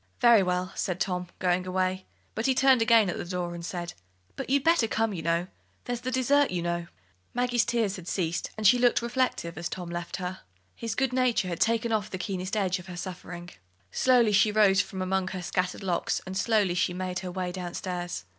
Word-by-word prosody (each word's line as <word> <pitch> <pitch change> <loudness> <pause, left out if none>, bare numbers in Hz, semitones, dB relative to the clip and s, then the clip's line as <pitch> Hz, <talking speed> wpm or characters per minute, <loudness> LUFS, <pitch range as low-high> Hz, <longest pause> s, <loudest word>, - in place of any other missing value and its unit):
"Very 235 -4 +7
well," 180 0 -1
said 180 -1 -2
Tom, 180 -1 -1
going 180 0 0
away. 185 0 -1 0.3
But 225 - -1
he 265 - +3
turned 265 -2 +5
again 225 -2 +5
at 180 - -2
the - - -4
door 175 -1 -3
and 170 0 -7
said: 175 0 -5 0.4
"But 270 - -5
you'd 275 0 +2
better 330 -8 +4
come, 225 -1 0
you 170 - -4
know. 170 +2 0 0.4
There's 245 -1 -3
the 255 - -3
dessert, 270 +3 +3
you 175 -2 -2
know." 170 0 -2 0.5
Maggie's 245 -1 +2
tears 220 -5 0
had 180 -2 -10
ceased, 170 -4 -1
and 215 - -4
she 245 +5 +7
looked 240 -1 +3
reflective 235 -8 -1
as 170 - -3
Tom 175 -2 -6
left 175 0 -4
her. 185 0 -4 0.4
His 230 -1 -4
good 260 0 0
nature 250 -7 +2
had 170 - -4
taken 230 0 +1
off 215 -3 0
the 185 - -4
keenest 185 +2 -3
edge 190 -2 0
of 180 - -12
her 180 -1 -8
suffering. 175 -1 -7 0.4
Slowly 245 -4 +4
she 210 +1 +4
rose 200 -2 +5
from 190 -1 -5
among 190 0 0
her 190 -1 -4
scattered 180 +1 -2
locks, 180 -3 0
and 190 0 -6
slowly 205 -3 +2
she 180 0 0
made 185 -1 -3
her 185 - -5
way 180 0 -3
down 180 -1 -6
stairs. 175 - -4
190 Hz, 215 wpm, -28 LUFS, 180-230 Hz, 0.5 s, Very